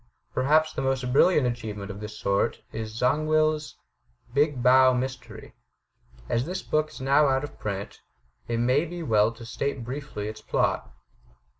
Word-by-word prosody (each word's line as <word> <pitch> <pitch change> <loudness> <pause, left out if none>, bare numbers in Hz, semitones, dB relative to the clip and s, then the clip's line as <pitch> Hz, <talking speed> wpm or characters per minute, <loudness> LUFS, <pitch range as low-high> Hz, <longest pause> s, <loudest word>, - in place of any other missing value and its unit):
Perhaps 155 +4 +3
the - - -3
most 130 -2 -1
brilliant 150 -1 +5
achievement 110 -4 -4
of 100 - -8
this 105 0 -7
sort 100 0 0
is 110 0 -5
Zangwill's 155 +4 +1 0.6
*'Big 145 -3 +1
Bow 130 0 +6
Mystery.'* 130 0 -5 0.7
As 120 - 0
this 185 +2 -4
book 155 0 0
is - - -11
now 140 +3 +4
out 135 0 +1
of 145 - -8
print, 100 -1 -5 0.5
it 115 - -1
may 130 +5 +3
be 175 +1 -6
well 110 -5 +3
to 115 0 -11
state 135 +2 -3
briefly 130 -4 -5
its 110 0 -7
plot. - - 0
130 Hz, 155 wpm, -26 LUFS, 115-150 Hz, 0.7 s, Bow